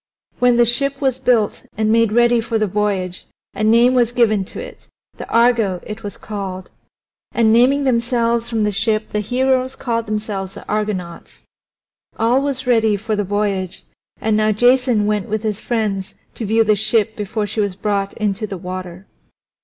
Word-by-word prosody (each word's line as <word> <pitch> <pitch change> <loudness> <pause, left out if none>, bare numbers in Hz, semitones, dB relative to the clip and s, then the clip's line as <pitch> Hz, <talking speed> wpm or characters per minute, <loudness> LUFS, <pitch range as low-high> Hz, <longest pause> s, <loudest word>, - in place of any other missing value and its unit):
When 245 -1 +4
the 240 - +5
ship 275 +4 0
was 265 -2 0
built 240 -5 +1
and 215 0 +1
made 230 -1 +3
ready 240 +1 +4
for 225 0 -2
the 215 - +1
voyage 195 -3 -2 0.3
a 215 - -3
name 235 +3 +5
was 240 -2 +2
given 220 -5 +2
to - - -9
it - - -10 0.3
the - - -8
Argo 230 -6 +3
it 215 +1 -7
was 205 -2 -7
called. 195 -3 -6 0.6
And 220 -2 +3
naming 260 +5 +4
themselves 235 -2 +1
from 225 -2 0
the 210 - +1
ship 215 +1 -1
the 210 - -1
heroes 255 +4 0
called 230 -2 -2
themselves 210 -3 -4
the - - -11
Argonauts. 205 -5 -4 0.7
All 240 +4 +2
was 275 -2 -3
ready 225 -4 +3
for 215 +2 -2
the 205 - 0
voyage, 200 -2 -2 0.4
and 220 -1 +1
now 215 0 +2
Jason 245 0 +3
went 210 -2 -1
with 215 +1 -2
his 215 -2 -2
friends 210 -5 -2 0.2
to 225 - -5
view 225 +2 +3
the 215 -1 +3
ship 220 +1 0
before 210 +1 -3
she 215 +1 -2
was 200 -3 -2
brought 200 -1 -1
into 215 0 -2
the 195 - -6
water. 185 0 -7
220 Hz, 175 wpm, -19 LUFS, 205-235 Hz, 0.7 s, the